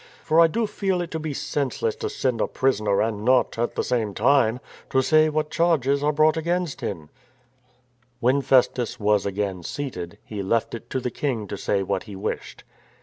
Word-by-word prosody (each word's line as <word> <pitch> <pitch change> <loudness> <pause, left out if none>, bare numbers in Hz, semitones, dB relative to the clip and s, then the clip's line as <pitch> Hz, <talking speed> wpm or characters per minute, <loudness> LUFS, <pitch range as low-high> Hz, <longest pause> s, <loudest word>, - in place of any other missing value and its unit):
For 160 +1 +3
I 165 - +8
do 230 +8 -1
feel 195 -3 -1
it 170 - -5
to 160 - -3
be 155 -1 -4
senseless 145 - -2
to 440 -2 -3
send 125 - -1
a - - +1
prisoner 105 -7 +1
and 110 -2 -2
not, 125 -1 +2
at 120 - -1
the - - 0
same 110 -5 -1
time, 125 0 +3 0.3
to 130 0 +2
say 155 +2 +4
what 155 0 -1
charges 145 -5 +2
are 150 - +3
brought 155 +1 +3
against 170 -1 -1
him," 80 -6 -5 1.1
When 130 +3 +2
Festus 130 -2 +2
was 105 -1 +2
again 100 -2 -2
seated, 90 -6 -5
he 105 -2 -5
left 110 +4 0
it 115 - -8
to 130 - -1
the 125 -1 -3
King 120 -7 -2
to - - -3
say 100 0 0
what - - -2
he 100 - -7
wished. 95 - -5
130 Hz, 195 wpm, -24 LUFS, 105-155 Hz, 1.1 s, I